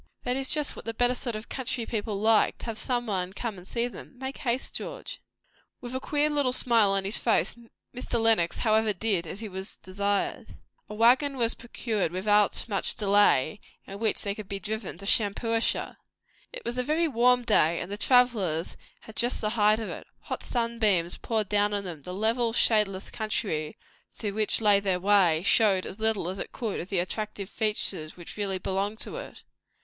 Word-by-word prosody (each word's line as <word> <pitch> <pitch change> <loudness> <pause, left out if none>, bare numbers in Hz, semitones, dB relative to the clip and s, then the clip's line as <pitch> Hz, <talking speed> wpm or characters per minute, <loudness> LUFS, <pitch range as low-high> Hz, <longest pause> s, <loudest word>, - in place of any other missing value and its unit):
That 250 0 -1
is 270 0 0
just 300 -2 0
what - - -10
the 230 0 -4
better 245 +1 +3
sort 245 -2 -4
of 215 +1 -7
country 255 -3 -3
people 210 -3 -3
like, 220 +1 +3
to - - -9
have 225 -2 -3
somebody 210 -7 -1
come 215 -2 -5
and 180 - -14
see 235 +2 -1
them. 245 - -11
Make 265 +1 -6
haste, 255 -2 -1
George." - - -4 0.6
With 245 0 -8
a 260 - -1
queer 295 +2 0
little 285 -4 +1
smile 230 -5 +4
on 195 0 0
his 200 +4 +3
face, 230 - +2 0.4
Mr. 240 -1 -2
Lenox 220 -7 +3
however 220 -1 +2
did 190 -3 0
as 195 +7 -7
he 220 - -5
was 190 0 -5
desired. 200 +3 -2 0.3
A 210 - -6
waggon 260 +5 +4
was 230 -2 +2
procured 225 -6 -3
without 205 +3 +2
very 210 - -4
much - - +1
delay, 205 -5 +3 0.3
in 195 +1 -9
which 220 -1 0
they 200 - -1
could 210 -1 -9
be 200 - -4
driven 215 -3 -5
to 200 - -10
Shampuashuh. 225 +2 +1 0.5
It - - -8
was 240 +1 -2
a - - +1
very 315 +5 +1
warm 250 -2 +3
day, 170 -7 +3
and 175 - -6
the - - -2
travellers 210 -9 +2 0.2
had 220 - -13
just 240 +1 +1
the 215 - -1
height 215 -1 +3
of 220 - -4
it. - - -8
Hot - - -5
sunbeams 220 -8 0
poured 220 -3 -1
down 205 +1 +1
upon 200 -1 -1
them; 170 -5 -7
the 180 +6 -7
level, 225 +3 +1
shadeless 210 -5 +2
country 200 -8 -2 0.4
through 205 -3 -4
which 215 +1 +1
lay 205 -2 +5
their 190 -2 0
way, 180 -4 +3
showed 200 -2 +3
as 195 - -8
little 220 -5 +1
as 190 +2 -4
it - - -6
could 225 -4 -3
of 175 - -6
the 195 - -1
attractive 200 +2 -3
features 200 -8 -1
which 175 - -10
really 200 -2 -2
belonged 195 +3 -2
to - - -6
it. - - -9
215 Hz, 195 wpm, -27 LUFS, 195-235 Hz, 0.6 s, lay